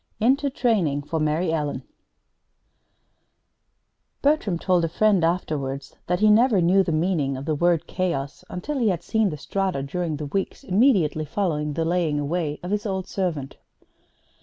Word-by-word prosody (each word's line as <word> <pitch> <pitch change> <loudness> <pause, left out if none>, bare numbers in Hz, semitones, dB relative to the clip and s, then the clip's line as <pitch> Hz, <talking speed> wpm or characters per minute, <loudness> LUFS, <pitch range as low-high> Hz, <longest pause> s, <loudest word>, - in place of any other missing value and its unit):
INTO 270 +5 +2
TRAINING 190 - +1
FOR 160 +2 -3
MARY 155 +3 0
ELLEN 145 -4 -2 2.4
Bertram 280 - +2
told 180 0 +1
a 165 - 0
friend 200 +1 +2
afterwards 145 -5 -2
that 180 +2 0
he 215 0 +6
never 225 -1 +4
knew 180 +3 +4
the 185 - -1
meaning 155 -4 0
of 135 - -7
the 155 - 0
word 170 +1 +2
"chaos" 170 -7 -3
until 275 +11 -4
he 230 -4 +3
had 175 -3 -2
seen 220 -2 +1
the 150 - -5
Strata 190 -3 -2
during 160 +2 -3
the 150 - -5
weeks 190 +7 -3
immediately 185 - +2
following 150 -3 -1
the 165 +2 -1
laying 165 -3 +1
away 150 0 -2
of 180 - -4
his 210 +1 -1
old 190 -2 -2
servant. 160 -10 -3
175 Hz, 160 wpm, -24 LUFS, 150-195 Hz, 2.4 s, he